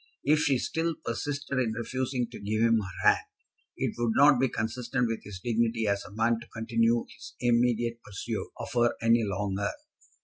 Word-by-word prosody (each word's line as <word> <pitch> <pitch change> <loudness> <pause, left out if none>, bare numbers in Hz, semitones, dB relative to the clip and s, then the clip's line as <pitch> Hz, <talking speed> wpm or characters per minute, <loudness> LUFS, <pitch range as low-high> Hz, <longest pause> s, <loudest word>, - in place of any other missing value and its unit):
If 150 +2 +4
she 145 -4 +3
still 165 +5 -1
persisted 140 +2 -2
in 115 -4 0
refusing 125 +2 -2
to - - -8
give 110 +2 0
him 115 -1 +4
her 90 -5 -2
hand, - - +4 0.5
it - - -1
would 120 -2 +1
not 140 -2 +6
be 130 0 +3
consistent 120 +3 -1
with 115 -1 -3
his 100 -3 -8
dignity 115 +1 0
as 100 -1 0
a 105 - -12
man 115 +1 +2
to 120 - -12
continue 115 +1 +1
his - - -12
immediate 120 -1 +1
pursuit 100 -2 -4
of - - -6
her 120 -1 +3
any 115 0 +4
longer. 100 -1 -1
115 Hz, 180 wpm, -28 LUFS, 110-125 Hz, 0.5 s, not